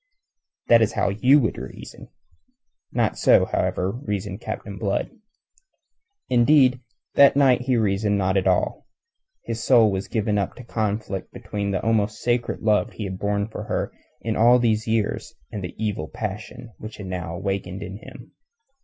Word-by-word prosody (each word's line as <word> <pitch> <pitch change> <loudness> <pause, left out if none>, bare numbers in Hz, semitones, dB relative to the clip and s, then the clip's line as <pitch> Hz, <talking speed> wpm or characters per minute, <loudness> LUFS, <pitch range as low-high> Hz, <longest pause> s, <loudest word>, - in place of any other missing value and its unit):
That 115 -1 +6
is 110 - +2
how - - +1
you 125 +9 +4
will 115 -6 +1
reason. - - -10 0.8
Not - - 0
so, - - +5
however, 95 +1 -1
reasoned 105 -4 -4
Captain 100 -3 -6
Blood. 100 -2 -1 1.2
Indeed, 130 +1 +4 0.3
that 140 -1 +6
night 130 -3 +4
he 125 -1 +1
reasoned 105 -1 +1
not 95 -1 +1
at 95 - +2
all. - - 0 0.6
His 115 -1 -4
soul 115 -5 +5
was 95 0 -3
given 105 -2 0
up 100 - -3
to 125 - -10
conflict 105 -4 -3
between 100 -1 -4
the 95 -2 -2
almost 110 -1 +1
sacred 120 0 -1
love 105 -1 +1
he 110 - -6
had 95 -2 -5
borne 100 0 -1
her - - -3 0.3
in 110 -1 -2
all 120 +3 +6
these 110 -2 +1
years 110 -2 -1 0.2
and 105 -3 -5
the 90 - -6
evil 105 -8 -2
passion 110 +5 -6
which 110 0 -8
she 105 - -9
had 95 - -7
now 90 -2 -4
awakened 95 0 -3
in 95 0 -7
him. - - -13
105 Hz, 160 wpm, -23 LUFS, 100-115 Hz, 1.2 s, That